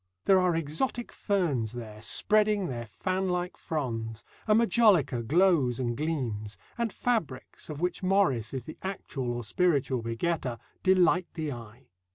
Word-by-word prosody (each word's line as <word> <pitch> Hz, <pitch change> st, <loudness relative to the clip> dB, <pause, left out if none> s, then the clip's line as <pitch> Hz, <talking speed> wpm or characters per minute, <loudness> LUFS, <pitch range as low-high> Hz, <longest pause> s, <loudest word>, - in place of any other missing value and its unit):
There 190 Hz, -1 st, +6 dB
are 180 Hz, -2 st, +2 dB
exotic 165 Hz, -, -2 dB
ferns 150 Hz, -, 0 dB
there, 110 Hz, -3 st, -8 dB
spreading 210 Hz, -, +2 dB
their 120 Hz, -6 st, -4 dB
fanlike 180 Hz, -, -2 dB
fronds, 115 Hz, -7 st, -4 dB, 0.2 s
and 215 Hz, 0 st, +5 dB
majolica 195 Hz, -, +4 dB
glows 145 Hz, -2 st, +3 dB
and 120 Hz, -2 st, -1 dB
gleams; 120 Hz, -9 st, -3 dB, 0.2 s
and 235 Hz, -2 st, -1 dB
fabrics, 180 Hz, -, -2 dB
of 150 Hz, 0 st, -6 dB
which 180 Hz, +2 st, -1 dB
Morris 185 Hz, -, +2 dB
is 130 Hz, -3 st, -5 dB
the 155 Hz, -, -9 dB
actual 145 Hz, -10 st, -4 dB
or 120 Hz, 0 st, -3 dB
spiritual 140 Hz, -, +1 dB
begetter, 120 Hz, +2 st, -2 dB, 0.2 s
delight 185 Hz, -1 st, +4 dB
the 155 Hz, -3 st, -2 dB
eye. 120 Hz, +1 st, -10 dB
155 Hz, 140 wpm, -29 LUFS, 120-185 Hz, 0.2 s, There